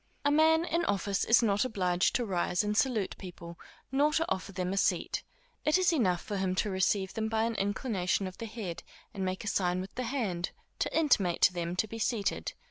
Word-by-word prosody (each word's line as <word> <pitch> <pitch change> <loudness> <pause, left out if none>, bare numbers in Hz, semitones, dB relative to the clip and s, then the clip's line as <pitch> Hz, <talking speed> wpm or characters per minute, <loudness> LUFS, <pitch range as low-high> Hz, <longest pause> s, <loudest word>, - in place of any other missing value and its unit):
A 285 - +4
man 320 +2 +4
in 335 0 0
office 200 0 0
is 230 +1 +5
not 205 -2 +2
obliged 180 -7 +1
to 245 - +1
rise 180 -1 0
and 210 0 -1
salute 220 -4 +1
people, 170 -2 -9 0.3
nor 285 +3 +3
to 325 +1 +2
offer 190 +1 -2
them 185 0 -2
a - - -3
seat; - - +1 0.4
it 305 +3 +4
is 365 -2 +3
enough 185 - +1
for 205 - -4
him 190 -1 0
to 205 +2 0
receive 190 0 +1
them 220 0 -2
by 220 0 +1
an 230 0 0
inclination 200 -2 -1
of 185 0 -7
the 230 - -4
head, 210 -6 -6 0.3
and 195 -3 -3
make 185 0 -2
a - - -6
sign 180 -2 +1
with 190 +1 -6
the 255 - -3
hand, 205 -10 -2 0.3
to - - 0
intimate 205 - +2
to 185 - +6
them 175 0 -3
to 185 - +1
be 225 +2 -7
seated. 220 -2 -1
200 Hz, 215 wpm, -30 LUFS, 185-235 Hz, 0.4 s, to